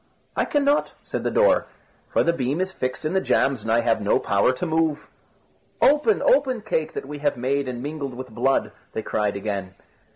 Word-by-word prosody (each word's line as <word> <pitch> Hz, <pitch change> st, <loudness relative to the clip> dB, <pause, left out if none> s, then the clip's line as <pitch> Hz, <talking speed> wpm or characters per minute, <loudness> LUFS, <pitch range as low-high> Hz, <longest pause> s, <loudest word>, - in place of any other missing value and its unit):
"I -, -, +1 dB
cannot," 290 Hz, 0 st, +1 dB
said -, -, -4 dB
the -, -, +1 dB
door, -, -, +3 dB, 0.4 s
"for -, -, +2 dB
the 170 Hz, -, +2 dB
beam 140 Hz, 0 st, -1 dB
is 190 Hz, +1 st, -1 dB
fixed 130 Hz, -3 st, -4 dB
in 155 Hz, -, -1 dB
the 190 Hz, -, +2 dB
jambs 135 Hz, -, +1 dB
and 110 Hz, -, -3 dB
I 115 Hz, +1 st, +4 dB
have 115 Hz, -2 st, +1 dB
no 100 Hz, -, +3 dB
power 100 Hz, +5 st, +2 dB
to 130 Hz, +7 st, -4 dB
move." 160 Hz, -2 st, 0 dB, 0.7 s
"Open, 300 Hz, +10 st, +4 dB
open, 265 Hz, -, +3 dB
cake 160 Hz, -7 st, -2 dB
that -, -, -4 dB
we 145 Hz, +1 st, -7 dB
have 145 Hz, -2 st, 0 dB
made 135 Hz, +3 st, 0 dB
and 125 Hz, -1 st, -5 dB
mingled 145 Hz, -3 st, -5 dB
with 130 Hz, +1 st, -7 dB
blood!" 130 Hz, +4 st, +1 dB, 0.2 s
they 110 Hz, -, -3 dB
cried 105 Hz, -1 st, -1 dB
again. 100 Hz, -2 st, -4 dB
140 Hz, 200 wpm, -24 LUFS, 120-180 Hz, 0.7 s, I